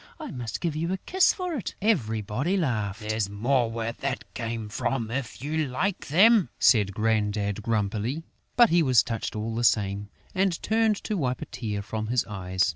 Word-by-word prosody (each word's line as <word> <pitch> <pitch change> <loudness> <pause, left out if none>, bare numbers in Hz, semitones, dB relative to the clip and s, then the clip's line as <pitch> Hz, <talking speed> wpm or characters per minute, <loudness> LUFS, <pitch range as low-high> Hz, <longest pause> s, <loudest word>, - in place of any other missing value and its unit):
I - - -6
must 120 -4 -5
give 165 -4 -1
you 165 +3 -1
a 190 - 0
kiss 370 - +3
for 365 -2 -4
it!..." 245 - -4
Everybody 130 - 0
laughed. 110 - -2
"There's 110 -2 0
more 120 +4 +1
where 115 0 -3
that 130 +2 -5
came 115 -2 -4
from, 115 +2 -2
if 130 -1 -4
you 155 +1 0
like 175 +10 -2
them!" 195 - +5
said 100 -5 +4
Grandad, 105 -2 0
grumpily. 110 +6 -1 0.3
But 240 -4 +6
he 170 0 +5
was 130 -7 +5
touched, 115 -1 -4
all 110 +1 -3
the 115 +1 -2
same, 100 -2 +1 0.2
and 190 -3 +1
turned 220 -1 +2
to 215 - -2
wipe 130 -6 -1
a - - -5
tear 105 -4 -4
from 110 +1 -4
his 120 +1 +1
eyes. 95 -2 -1
115 Hz, 185 wpm, -26 LUFS, 105-165 Hz, 0.3 s, But